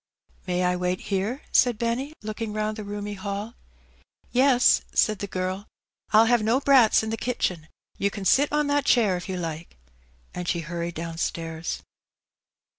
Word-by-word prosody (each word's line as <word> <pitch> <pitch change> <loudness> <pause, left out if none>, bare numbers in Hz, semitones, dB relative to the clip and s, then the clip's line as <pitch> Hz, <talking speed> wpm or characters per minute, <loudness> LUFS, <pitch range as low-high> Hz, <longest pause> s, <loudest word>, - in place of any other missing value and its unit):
" - - -33
May 180 0 0
I 180 0 +2
wait 180 0 -1
here? 205 +7 -2
" - - -31
said 245 -3 +4
Benny, 240 +6 -2
looking 215 0 -4
round 215 0 -1
the 215 - -6
roomy 205 0 -5
hall. 200 +2 -4
'^ - - -22 0.8
Yes," 255 -1 +4
said 215 -3 +3
the 200 - -4
girl; 185 0 -2
'^ 200 - -13 0.5
Fll 220 +1 +6
have 240 -1 +4
no 225 +5 +2
brats 265 -6 +5
in 220 - -3
the 225 - -2
kitchen; 180 -10 -2 0.3
you 200 - +2
can 200 -1 -7
sit 285 +8 +4
on 300 0 +2
that 285 -1 +1
chair 220 -9 +4
if 180 +2 -6
you 185 - -2
like; 165 - -6 0.3
" - - -34
and 180 0 -5
she 170 -1 0
hurried 170 +1 -4
downstairs. 165 0 -4
205 Hz, 190 wpm, -25 LUFS, 180-235 Hz, 0.8 s, Fll